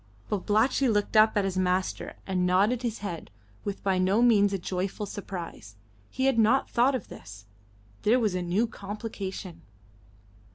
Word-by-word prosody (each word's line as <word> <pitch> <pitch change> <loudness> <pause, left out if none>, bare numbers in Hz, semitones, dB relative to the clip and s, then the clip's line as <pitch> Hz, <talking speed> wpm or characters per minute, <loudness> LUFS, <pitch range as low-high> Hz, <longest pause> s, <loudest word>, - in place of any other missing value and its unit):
Babalatchi 220 +6 +2
looked 205 -1 0
up 215 0 +5
at 200 - +2
his 190 -1 -1
master 185 0 -1
and 185 -2 -1
nodded 200 +7 +2
his 235 -3 -3
head 170 -4 -5 0.3
with 200 -1 -5
by 190 -2 +1
no 195 +5 +3
means 205 -4 +5
a 195 - 0
joyful 185 +3 -3
surprise. 175 - -7 0.3
He 260 - -2
had 265 -4 +3
not 235 +5 +3
thought 255 +3 +3
of 245 - -5
this; 100 0 -11 0.6
there 235 +4 +3
was 215 -5 +1
a 180 - -1
new 180 +6 +1
complication. 200 -4 -7
200 Hz, 160 wpm, -27 LUFS, 185-225 Hz, 0.6 s, up